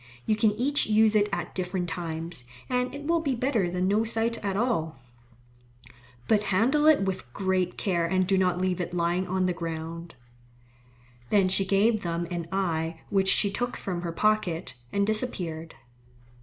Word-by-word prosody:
You 215 - +2
can 215 0 +4
each 270 +7 +2
use 215 0 +4
it 210 0 +3
at 175 0 -3
different 180 -1 -2
times, 165 -3 -4 0.3
and 250 0 0
it 290 - -7
will 335 +3 +2
be 280 -5 -1
better 235 -7 0
than 180 +1 0
no 210 +3 +2
sight 225 +1 -1
at 195 -1 -1
all. 205 - 0 1.3
But 210 -2 +4
handle 245 +10 +2
it 310 -9 +6
with 185 -10 -3
great 185 -2 0
care 170 -4 0
and 185 +1 +2
do 195 +1 +2
not 185 -2 +2
leave 185 -1 0
it 175 0 -4
lying 175 +2 0
on 185 0 0
the 180 - +1
ground." 165 -1 -6 1.1
Then 195 -3 +4
she 195 +1 +2
gave 205 +3 +3
them 170 0 -2
an 170 -2 -3
eye 165 -4 -1
which 195 -1 +2
she 200 0 +3
took 245 +4 -3
from 180 -3 -4
her 170 -1 -3
pocket, 185 -3 0 0.2
and 200 0 +1
disappeared. 180 -8 -3
190 Hz, 170 wpm, -27 LUFS, 175-215 Hz, 1.3 s, it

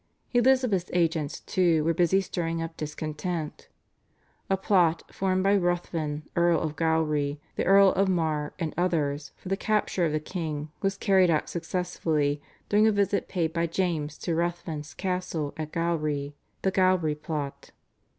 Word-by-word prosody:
Elizabeth's 245 -7 +3
agents, 165 -4 0
too, 170 -4 +2
were 165 +2 +2
busy 175 +3 +3
stirring 165 -3 -2
up 165 0 -4
discontent. 155 +1 -4 0.8
A 195 - +2
plot 175 -4 +2
formed 185 -1 0
by 200 +1 +4
Ruthven 170 -5 -1
Earl 170 -1 +3
of 155 -2 -3
Gowrie, 150 -2 +1 0.2
the - - -1
Earl 195 0 +7
of 195 +1 +2
Mar, 155 -4 0
and 165 -4 -3
others, 155 -5 0
for 185 - -9
the 195 - +2
capture 210 -3 0
of 165 - +2
the 155 - 0
king, 155 -2 -4
was 195 0 0
carried 190 -3 +4
out 155 -2 +1
successfully 165 -4 -1 0.3
during 210 +1 +4
a - - +5
visit 200 -1 +1
paid 165 -4 -1
by 170 0 0
James 160 -4 -1
to 170 - -2
Ruthven's 170 -2 -3
castle 180 -6 -2
at 155 -1 -5
Gowrie 155 -4 -1 0.3
(The 190 - +2
Gowrie 185 -5 +3
Plot). 150 -2 -5
170 Hz, 150 wpm, -27 LUFS, 155-185 Hz, 0.8 s, Earl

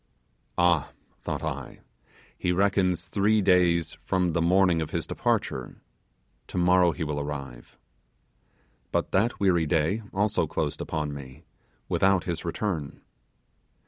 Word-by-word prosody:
Ah! 85 -4 +2 0.3
thought - - -4
I, - - -5 0.5
he 90 - -1
reckons 90 -2 +1
three 105 +4 +2
days 85 -4 +2
from 90 -2 0
the 85 - +1
morning 90 -1 +3
of 80 - -3
his - - -2
departure, - - -2 0.7
tomorrow 90 0 +3
he 85 - -4
will 75 -1 -2
arrive. 70 -4 -7 1.1
But - - -1
that 110 +5 +1
weary 85 -5 +2
day 80 +7 +1
also 100 -3 +1
closed 75 -1 -2
upon 75 -2 -3
me, 65 -2 -10 0.4
without 95 -2 +2
his 85 -3 -3
return. 85 -4 -3
85 Hz, 120 wpm, -27 LUFS, 80-95 Hz, 1.1 s, morning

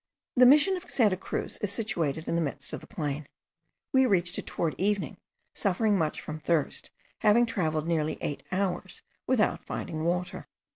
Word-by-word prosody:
The 250 -1 +8
Mission 300 +8 +6
of 360 0 -10
Santa 215 -7 +3
Cruz 185 - -4
is 205 - -1
situated 170 - -1
in - - -1
the 170 - +2
midst 145 -4 -2
of - - -3
the - - -13
plain. 145 -2 -4 0.7
We 265 -1 +5
reached 175 -4 +2
it - - -8
towards 165 -2 -1
the - - -2
evening, 205 0 0 0.4
suffering 205 +1 +2
much 160 -5 0
from 155 0 -6
thirst, 155 -2 +1 0.3
having 220 +3 +5
travelled 160 -9 -1
nearly 160 -2 0
eight 145 - -3
hours 190 -1 -1 0.2
without 250 -4 +2
finding 155 0 -4
water. 180 +2 -2
180 Hz, 175 wpm, -28 LUFS, 160-215 Hz, 0.7 s, The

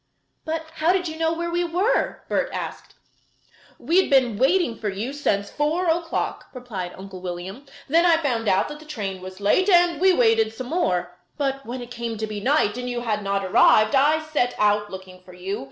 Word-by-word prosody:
"But 320 0 -3
how 320 +3 +3
did 365 -1 0
you 315 - -5
know 325 0 0
where 340 +1 -3
we 350 +1 0
were?" 360 +8 0
Bert - - 0
asked. - - -6 0.8
"We 355 +3 +3
had - - -4
been 260 -5 +3
waiting 275 -2 +2
for 210 - -2
you 215 +8 -4
since 200 -8 -1
four 315 +5 0
o'clock," 330 0 -2
replied 205 -8 -6
Uncle 190 -1 -9
William. 185 +9 -7 0.2
"Then 330 +4 +4
I 335 -2 +5
found 240 -8 -1
out 190 - +3
that 300 0 -8
the 310 - -14
train 200 -10 -5
was 185 +1 -9
late, 210 - +2
and 350 -3 +4
we 380 0 +6
waited 225 -7 +3
some 250 +1 -6
more. 180 - -1 0.2
But 275 -2 -2
when 245 +1 -5
it 240 - -12
came 235 -2 -4
to 220 - -2
be 215 -1 -5
night 250 -2 +1
and 250 0 -4
you 245 -1 -3
had 215 -3 -1
not 200 0 -1
arrived, 215 +2 +5
I 300 +3 +3
set 270 -6 0
out 210 0 +2
looking 185 -1 -10
for 180 0 -15
you. 185 +3 -4
245 Hz, 205 wpm, -23 LUFS, 205-320 Hz, 0.8 s, we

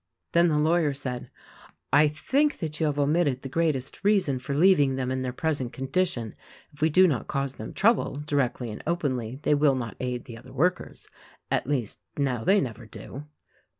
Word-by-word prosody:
Then 170 +1 +4
the 155 -3 +2
lawyer 155 -1 +2
said, 130 -3 -5 0.6
"I 150 +2 +6
think 275 - +1
that 155 -3 -5
you 160 - +2
have 145 -1 -1
omitted 145 -2 +1
the 135 - -5
greatest 145 -2 -1
reason 195 -10 +2
for 140 +2 -4
leaving 145 -5 +4
them 130 -1 -2
in 130 0 -1
their 130 -1 -2
present 135 -2 -2
condi 135 +8 0
tion. 115 -3 -5 0.4
If 150 - -17
we 160 - +4
do 185 +5 +6
not 150 -9 0
cause 140 -1 -2
them 110 - -8
trouble, 225 -8 +2
directly 140 -5 -1
and 105 - -7
openly, 130 -8 -1
they - - +3
will 145 -2 +4
not 115 -5 -5
aid 125 -1 -3
the 115 -2 -9
other - - -14
workers. 180 +7 -1 0.4
At - - 0
least, 130 -7 -1 0.2
now 130 -5 0
they 200 - +4
never 115 - -5
do." 140 +6 -9
140 Hz, 190 wpm, -26 LUFS, 130-160 Hz, 0.6 s, I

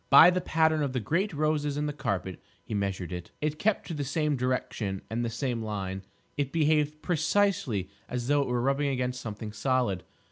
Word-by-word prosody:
By 175 - +10
the 180 0 0
pattern 160 -2 +2
of 140 -3 -1
the 130 - +1
great 170 - 0
roses 150 -2 0
in 150 - 0
the 150 - -2
carpet 95 - -3 0.2
he - - -7
measured 95 -4 -2
it. 90 -1 -6
It 150 0 -1
kept 215 0 +1
to 170 - -5
the 145 -2 -2
same 150 +2 0
direction 120 -6 -2
and 120 +2 0
the 120 - 0
same 120 0 -2
line. 95 -3 -3 0.4
It 140 -2 0
behaved 150 -1 +2
precisely 160 - +1 0.2
as 125 -1 -3
though 145 0 +4
it 140 - -1
were 125 -1 0
rubbing 140 +2 +2
against 125 -1 -1
something 105 -1 -5
solid. 125 -8 0
135 Hz, 200 wpm, -29 LUFS, 110-150 Hz, 0.4 s, By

